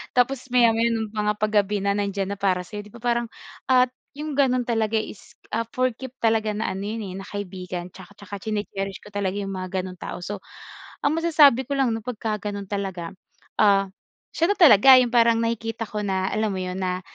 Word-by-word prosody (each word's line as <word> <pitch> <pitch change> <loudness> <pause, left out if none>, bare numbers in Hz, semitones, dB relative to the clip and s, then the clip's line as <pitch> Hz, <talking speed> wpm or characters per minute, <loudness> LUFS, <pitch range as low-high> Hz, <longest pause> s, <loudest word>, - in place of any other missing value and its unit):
tapos 255 +1 +1
maya-maya 235 -2 +4
ng 220 -2 -3
mga 210 -1 0
pag 210 0 -1
gabi 205 -1 +1
na 200 - +2
nandiyan 200 -1 -1
na - - -20
para 185 -2 +1
sa'yo, 205 +3 -8
'di - - -17
ba, 235 - -13
parang 235 -1 +1 0.4
at 255 -1 +4 0.2
yung 300 +1 -5
ganon 260 -3 +2
talaga 225 -2 0
is, 215 -2 -4 0.2
ah, 230 +1 -1
for 255 0 +2
keep 260 +2 -10
talaga 220 -2 +2
na 215 - -2
ano 195 +2 -4
yan, 220 +1 -4
eh, 190 -2 -6
na 195 - -9
kaibigan 185 -3 -6
'tsaka 190 +2 -14
'tsaka 205 0 -9
chine 210 +1 -2
cherish 195 0 -5
ko 210 - -13
talaga 200 -1 -2
yung 200 -1 -3
mga 185 0 -3
gano'ng 180 -1 -8
tao. 180 - -6
So, 205 +2 -5 0.6
ang 285 +2 +2
masasabi 290 -7 +5
ko 280 - -1
lang 270 -3 +2
'no 225 - -2
pagkaganon 210 -3 -4
talaga, 190 -4 -3 0.5
ah, 195 -2 +4 0.5
siya 335 +4 +2
na - - -16
talaga 265 - +9
yung 245 - 0
parang 230 -1 +4
nakikita 230 0 -2
ko 210 - -3
na 190 -1 0
alam 215 -1 -1
mo 190 - -3
yun 185 0 -4
na 185 -1 -2
210 Hz, 210 wpm, -24 LUFS, 195-235 Hz, 0.6 s, talaga